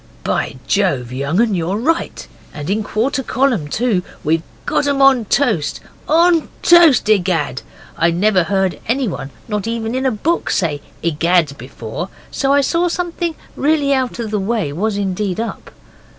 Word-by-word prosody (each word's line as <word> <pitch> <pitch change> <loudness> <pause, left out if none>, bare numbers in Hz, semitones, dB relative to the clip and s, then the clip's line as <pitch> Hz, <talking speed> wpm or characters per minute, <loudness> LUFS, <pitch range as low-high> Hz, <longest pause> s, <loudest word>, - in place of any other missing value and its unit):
'By - - -1
Jove, 140 -12 0
young 140 +7 -1
un, 230 -2 +3
you're 180 +2 -1
right! 320 +9 -1 0.3
And 150 +4 -4
in 215 +2 +1
quarter 230 +6 -1
column, 255 - 0
too! 215 +3 0 0.2
We've 160 +2 +1 0.2
got 285 - +1
em 280 -1 +1
on 270 -4 +5
toast 210 - +1 0.3
on 335 +1 +4
toast 335 -9 +6
egad!' 180 - +1 0.3
I 170 - +2
never 185 +1 +2
heard 190 -2 0
anyone 230 - -1 0.2
not 210 -1 -2
in 230 +3 -2
a - - +2
book 315 +11 -1
say 155 -6 0 0.2
'egad' 165 -1 +2
before, 125 - -6 0.2
so 275 -1 0
I 285 0 +5
saw 335 +5 +1
something 345 -1 -2 0.2
really 285 -1 +2
out 260 -3 -1
of 230 -3 -4
the 210 - 0
way 195 -7 -1
was 205 +5 -1
indeed 195 -1 -2
up. 230 0 -5
215 Hz, 155 wpm, -18 LUFS, 175-270 Hz, 0.3 s, toast